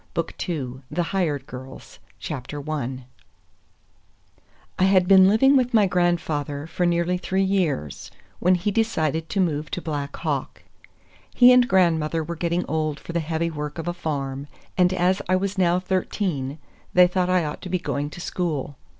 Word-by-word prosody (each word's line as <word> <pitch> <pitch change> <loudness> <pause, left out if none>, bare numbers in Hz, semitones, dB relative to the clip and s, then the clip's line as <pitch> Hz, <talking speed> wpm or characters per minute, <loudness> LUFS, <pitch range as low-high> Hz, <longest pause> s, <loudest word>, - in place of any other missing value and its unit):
BOOK 165 -1 -2 0.2
II—THE 140 +1 -3
HIRED 155 -8 0
GIRLS 130 +1 -11 0.3
I 140 -2 -4 1.8
I - - +3
HAD 190 -2 +4
been 190 0 +7
living 270 +8 +5
with 250 -2 +2
my 210 -2 +6
grandfather 160 -5 0
for 175 +2 -1
nearly 170 +1 +1
three 190 +1 0
years 175 - -1 0.3
when 180 +1 +4
he 180 +4 -1
decided 165 -8 0
to 200 - -2
move 155 -5 0
to - - -3
Black 145 -4 -4
Hawk. - - -3 0.7
He 250 0 +8
and 250 -1 +5
grandmother 165 -4 +2
were 170 +2 -5
getting 170 +2 -1
old 155 -1 -1
for 170 - -8
the 170 - +1
heavy 165 +1 -2
work 150 0 -5
of 165 - -5
a 175 - -1
farm, 140 -4 -4 0.3
and 180 -1 +3
as 185 0 +1
I 185 - +4
was 195 +1 -1
now 175 -1 +3
thirteen 180 -6 -2 0.4
they 180 0 +8
thought 180 0 0
I 180 -3 +2
ought 150 - -5
to 185 - -7
be 185 - +1
going 145 -4 -3
to 165 - -10
school. 155 -6 -3
170 Hz, 165 wpm, -24 LUFS, 150-185 Hz, 1.8 s, He